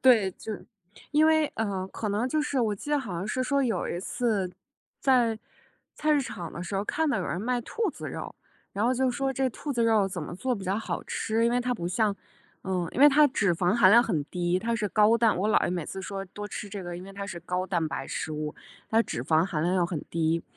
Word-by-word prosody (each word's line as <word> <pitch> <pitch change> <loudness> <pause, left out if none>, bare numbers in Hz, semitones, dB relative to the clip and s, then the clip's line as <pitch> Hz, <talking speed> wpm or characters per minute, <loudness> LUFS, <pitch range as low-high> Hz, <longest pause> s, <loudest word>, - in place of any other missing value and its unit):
对。 225 -7 +5
就 220 - -7 0.6
因 300 +1 +5
为， 315 -1 +4
呃， 200 -4 -2
可 215 - -4
能 210 +5 0
就 305 +2 +1
是 280 -2 -1
我 220 -3 +1
记 250 +9 -8
得 295 - +3
好 225 -9 -5
像 170 +3 -3
是 235 +4 -2
说 280 +1 +1
有 225 -8 0
一 175 - -3
次， 205 -3 -1 0.5
在 240 -4 +3 0.6
菜 305 0 +1
市 290 - +4
场 175 -10 -6
的 170 - -6
时 185 - -5
候， 195 +1 0
看 320 +7 0
到 280 - +1
有 180 - -2
人 175 - -2
卖 245 +3 0
兔 440 - -2
子 - - -7
肉， - - -6 0.4
然 205 +3 -1
后 245 - +3
就 260 +1 +1
说 270 +1 -1
这 265 0 +1
兔 285 +5 -5
子 235 -3 +1
肉 220 -4 +3
怎 185 -2 -5
么 160 - -6
做 255 +8 -1
比 200 -4 -7
较 190 +2 0
好 225 - -3
吃， 225 +1 0
因 235 - +3
为 245 - +2
它 250 0 0
不 175 -8 -3
像 205 +3 +1 0.5
呃， 180 -3 -1
因 260 - -3
为 290 - +10
它 295 +1 +6
脂 200 -8 +1
肪 175 +2 +1
含 210 -5 +6
量 235 +2 +8
很 165 -11 -1
低， 175 +3 0
它 230 +4 -1
是 210 -2 -1
高 215 +3 +5
蛋 225 -4 +3
我 200 +4 0
姥 - - +4
爷 - - 0
每 175 -3 -2
次 190 - -6
说 195 +1 -4
多 205 +2 -8
吃 205 - -6
这 200 -1 -6
个， 175 -1 -5
因 180 - -8
为 195 - -10
它 200 0 -5
是 190 -3 -6
高 180 +2 -2
蛋 175 -3 0
白 - - -4
食 155 - -4
物。 150 0 -3 0.4
它 225 - +4
脂 120 - -4
肪 160 +4 +3
含 165 -5 -2
量 175 +3 +1
又 175 -2 +2
很 170 -4 -4
低， 165 0 +1
205 Hz, 275 characters per minute, -27 LUFS, 180-245 Hz, 0.6 s, 为